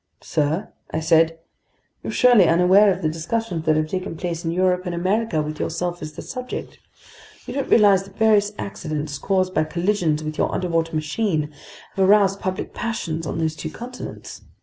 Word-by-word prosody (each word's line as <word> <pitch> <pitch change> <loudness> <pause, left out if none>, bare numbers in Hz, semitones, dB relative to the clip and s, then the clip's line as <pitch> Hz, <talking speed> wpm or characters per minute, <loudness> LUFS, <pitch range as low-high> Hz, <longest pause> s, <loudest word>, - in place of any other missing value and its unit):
"Sir," 155 +7 -1 0.2
I 160 - -2
said, 165 0 +3 0.6
"you're - - -4
surely 240 -8 +5
unaware 185 +5 +5
of 185 0 -3
the - - +2
discussions 165 +2 -3
that 155 - +4
have 155 0 +1
taken 185 0 -4
place 170 -1 -4
in 165 - -1
Europe 180 +1 +1
and 175 - -2
America 185 -2 0
with 155 0 -6
yourself 175 +1 -2
as 155 0 -6
the - - -8
subject. 255 -1 -6 0.7
You - - -6
don't 275 -1 -2
realize 205 -4 +6
that 195 0 -17
various 210 -2 +4
accidents, 150 -6 -4
caused 185 +2 0
by - - +2
collisions 170 -2 0
with 155 0 -5
your - - +1
underwater 165 -2 -1
machine, 155 -1 -1 0.4
have 190 -1 +2
aroused 200 -1 +4
public 185 0 -4
passions 165 -9 -3
on - - -3
those 160 -1 -1
two 160 - -5
continents. 250 +8 -8
175 Hz, 175 wpm, -22 LUFS, 160-200 Hz, 0.7 s, realize